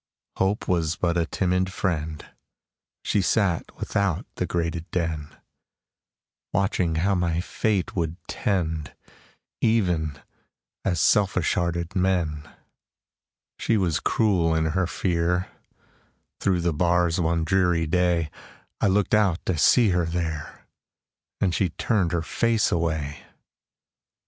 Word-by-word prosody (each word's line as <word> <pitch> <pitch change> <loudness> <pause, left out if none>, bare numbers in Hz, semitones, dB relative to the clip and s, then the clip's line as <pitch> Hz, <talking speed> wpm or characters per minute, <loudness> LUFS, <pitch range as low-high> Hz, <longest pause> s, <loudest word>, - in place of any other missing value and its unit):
Hope 95 +3 0
Was 85 -2 +1
but 85 -2 0
a 85 -2 +1
timid 90 +1 0
friend; 80 -5 -2 0.8
She 105 - +1
sat 95 -3 0
without 100 -5 -1
the - - -2
grated 85 -1 -2
den, 80 -4 -3 1.2
Watching 95 -3 +1
how 95 +5 +2
my 85 -2 0
fate 100 +1 -1
would 85 -2 -1
tend, 80 -6 -2 0.7
Even 90 -10 +1 0.7
as 90 -3 0
selfish 95 -4 +3
hearted 85 +1 -2
men. 85 -6 0 1.1
She 115 - +1
was 90 -6 +1
cruel 90 -7 +2
in 80 0 +1
her 95 -1 +1
fear; 90 +1 0 0.9
Through 90 -3 +1
the 85 -1 +1
bars 85 +1 +2
one 85 0 +1
dreary 90 -1 +2
day, 85 -2 +1 0.5
I - - +4
looked 100 +1 +1
out 100 -5 +2
to 95 - 0
see 110 - +5
her 90 -2 +1
there, 80 -3 -4 0.7
And 95 -3 +1
she 95 +1 +1
turned 95 0 0
her 85 -2 0
face 115 +4 +1
away! 80 -4 -1
85 Hz, 120 wpm, -25 LUFS, 80-95 Hz, 1.2 s, see